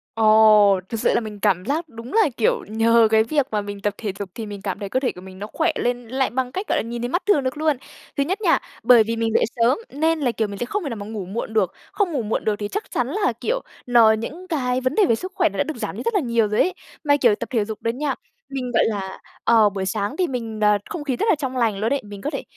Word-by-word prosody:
Ồ! 215 Hz, -3 st, +6 dB
Thực 225 Hz, -, -3 dB
sự -, -, +2 dB
là -, -, +3 dB
mình 215 Hz, -3 st, -7 dB
cảm 190 Hz, -3 st, +1 dB
giác 315 Hz, +3 st, -2 dB
đúng 230 Hz, 0 st, -10 dB
là, 435 Hz, -7 st, +4 dB
kiểu, 225 Hz, -, +1 dB
nhờ 225 Hz, +1 st, +4 dB
cái 220 Hz, 0 st, +5 dB
việc 285 Hz, +3 st, +1 dB
mà 210 Hz, -1 st, 0 dB
mình 205 Hz, 0 st, -7 dB
tập 205 Hz, 0 st, 0 dB
thể 210 Hz, -4 st, -3 dB
dục 200 Hz, -2 st, -5 dB
thì 225 Hz, -, -5 dB
mình 205 Hz, -2 st, -7 dB
cảm 195 Hz, -3 st, -4 dB
thấy 200 Hz, -, -5 dB
cơ 260 Hz, -, +1 dB
thể 260 Hz, -, 0 dB
của 180 Hz, -, -12 dB
mình 190 Hz, 0 st, -12 dB
nó 210 Hz, -, -5 dB
khỏe 330 Hz, +1 st, +2 dB
lên 245 Hz, -1 st, -2 dB
lại 265 Hz, +3 st, 0 dB
bằng 255 Hz, 0 st, -2 dB
cách, 380 Hz, +8 st, -4 dB
gọi -, -, +1 dB
là, -, -, +1 dB
nhìn 235 Hz, +1 st, -5 dB
thấy 240 Hz, -, -2 dB
mắt 350 Hz, +7 st, -1 dB
thường 350 Hz, -10 st, +3 dB
được 260 Hz, +3 st, -2 dB
luôn. 305 Hz, -2 st, +1 dB, 0.4 s
Thứ 280 Hz, -, +3 dB
nhất 380 Hz, +8 st, -2 dB
nha, -, -, +3 dB, 0.2 s
bởi 240 Hz, -3 st, +7 dB
vì 230 Hz, +1 st, -2 dB
mình 225 Hz, -1 st, -1 dB
dậy -, -, +4 dB
sớm 235 Hz, +3 st, +3 dB
nên 320 Hz, +3 st, 0 dB
là, 255 Hz, -5 st, +1 dB
kiểu, 220 Hz, -2 st, -1 dB
mình 200 Hz, -, -7 dB
sẽ 240 Hz, -, -1 dB
không 405 Hz, +10 st, -3 dB
thể 290 Hz, -, -3 dB
nào 230 Hz, -, -4 dB
mà 205 Hz, -, -6 dB
ngủ 215 Hz, -3 st, -5 dB
muộn 220 Hz, +4 st, -5 dB
được, 200 Hz, -5 st, +1 dB, 0.2 s
không 395 Hz, -5 st, 0 dB
ngủ 275 Hz, -, -1 dB
muộn 220 Hz, 0 st, -2 dB
được 215 Hz, -1 st, +2 dB
thì 205 Hz, -, -2 dB
chắc 420 Hz, -, -5 dB
chắn -, -, 0 dB
là, 420 Hz, -1 st, 0 dB
kiểu, -, -, 0 dB, 0.2 s
nó 235 Hz, -3 st, +6 dB
những 295 Hz, +12 st, -4 dB
cái 255 Hz, -6 st, -1 dB
vấn 255 Hz, +3 st, -1 dB
đề 420 Hz, -, +5 dB
về 230 Hz, -, +3 dB
sức 370 Hz, -, -6 dB
khỏe 340 Hz, -4 st, +3 dB
nó -, -, -9 dB
đã -, -, +2 dB
được 315 Hz, +1 st, -6 dB
giảm -, -, -4 dB
đi -, -, -5 dB
rất 465 Hz, -, -1 dB
là 405 Hz, -, +3 dB
nhiều 235 Hz, -, +1 dB
rồi 210 Hz, -, +2 dB
ấy. 370 Hz, -, +1 dB, 0.3 s
Mà, 285 Hz, -1 st, +4 dB
kiểu, 235 Hz, -6 st, +4 dB
tập -, -, -6 dB
thể 225 Hz, -5 st, +1 dB
dục 215 Hz, 0 st, -7 dB
đó 230 Hz, -, -1 dB
nha, 275 Hz, +4 st, -1 dB, 0.3 s
mình, 255 Hz, -2 st, -4 dB
gọi 225 Hz, -, +3 dB
là, 195 Hz, -3 st, -3 dB, 0.2 s
ờ, 225 Hz, -3 st, +5 dB
buổi 195 Hz, -1 st, -4 dB
sáng 205 Hz, +7 st, -2 dB
thì 365 Hz, -, +1 dB
mình, 230 Hz, -5 st, -4 dB
ờ, 210 Hz, 0 st, +5 dB
không 320 Hz, -4 st, -5 dB
khí 270 Hz, -3 st, -1 dB
rất 240 Hz, -, -1 dB
là 360 Hz, -, +5 dB
trong 265 Hz, -3 st, -4 dB
lành 225 Hz, -5 st, +1 dB
luôn 225 Hz, +7 st, 0 dB
ấy, 280 Hz, -, -1 dB
mình 205 Hz, -1 st, -10 dB
có 295 Hz, -, -2 dB
thể 275 Hz, -, -4 dB
235 Hz, 305 wpm, -22 LUFS, 215-285 Hz, 0.4 s, bởi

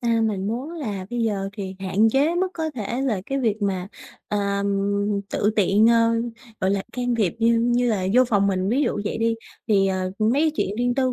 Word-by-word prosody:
à, 230 Hz, -2 st, +1 dB
mình 200 Hz, -3 st, -1 dB
muốn 245 Hz, +8 st, -3 dB
là 210 Hz, -, -5 dB
bây 240 Hz, 0 st, -2 dB
giờ 200 Hz, -3 st, -1 dB
thì 195 Hz, -2 st, -6 dB
hạn 195 Hz, +3 st, +2 dB
chế 285 Hz, +7 st, +2 dB
mức 370 Hz, +2 st, +1 dB
có 320 Hz, -1 st, -2 dB
thể 235 Hz, +2 st, -3 dB
là 230 Hz, -8 st, 0 dB
cái 275 Hz, -, -1 dB
việc 220 Hz, -4 st, 0 dB
mà, 190 Hz, -2 st, -1 dB, 0.4 s
à, 200 Hz, -1 st, 0 dB, 0.7 s
tự 210 Hz, -, +1 dB
tiện, 205 Hz, +2 st, +4 dB
ơ, 230 Hz, 0 st, +4 dB, 0.5 s
gọi 190 Hz, -, +1 dB
là, 195 Hz, -1 st, 0 dB
can 245 Hz, 0 st, -1 dB
thiệp 210 Hz, -7 st, +1 dB
như 230 Hz, 0 st, +3 dB
như 240 Hz, +1 st, +2 dB
là 190 Hz, -4 st, 0 dB
vô 255 Hz, +1 st, +6 dB
phòng 205 Hz, -5 st, +2 dB
mình. 190 Hz, -1 st, 0 dB
Ví 260 Hz, +6 st, +2 dB
dụ 210 Hz, -, 0 dB
vậy 210 Hz, -, -2 dB
đi 230 Hz, 0 st, +1 dB, 0.3 s
thì, 195 Hz, -2 st, +4 dB
ờ, 185 Hz, -1 st, -1 dB
mấy 215 Hz, +1 st, +2 dB
cái 320 Hz, -, +3 dB
chuyện 200 Hz, -, -1 dB
riêng 245 Hz, +1 st, +1 dB
tư 260 Hz, -1 st, +1 dB
220 Hz, 220 wpm, -23 LUFS, 200-245 Hz, 0.7 s, vô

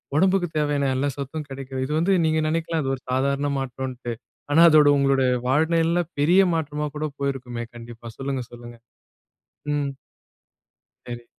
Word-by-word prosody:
ஒடம்புக்கு 185 Hz, +2 st, +3 dB
தேவையான 145 Hz, -2 st, +1 dB
எல்லா 140 Hz, +2 st, 0 dB
சத்தும் 145 Hz, +2 st, -5 dB
கெடைக்கிது. 135 Hz, -1 st, -6 dB
இது 140 Hz, -, -5 dB
வந்து 185 Hz, +4 st, +2 dB
நீங்க 160 Hz, 0 st, +2 dB
நினைக்கலாம் 165 Hz, 0 st, -1 dB
அது 135 Hz, -, -1 dB
ஒரு 130 Hz, -, -14 dB
சாதாரண 140 Hz, +2 st, +1 dB
மாற்றம்ன்ட்டு. 130 Hz, -2 st, -5 dB, 0.4 s
ஆனா 160 Hz, +3 st, +5 dB
அதோட 150 Hz, -2 st, +6 dB
உங்களுடைய 135 Hz, -2 st, +3 dB, 0.2 s
வாழ்நெலையில 165 Hz, +5 st, +2 dB, 0.2 s
பெரிய 175 Hz, +7 st, +5 dB
மாற்றமா 150 Hz, -1 st, -2 dB
கூட 155 Hz, -, -2 dB
போயிருக்குமே 125 Hz, -4 st, -3 dB
கண்டிப்பா. 120 Hz, 0 st, -10 dB
சொல்லுங்க 135 Hz, -1 st, -2 dB
சொல்லுங்க. 120 Hz, 0 st, -11 dB, 1.0 s
ம். 145 Hz, -1 st, -1 dB, 1.1 s
சரி. 120 Hz, -1 st, -7 dB
140 Hz, 135 wpm, -24 LUFS, 130-155 Hz, 1.1 s, அதோட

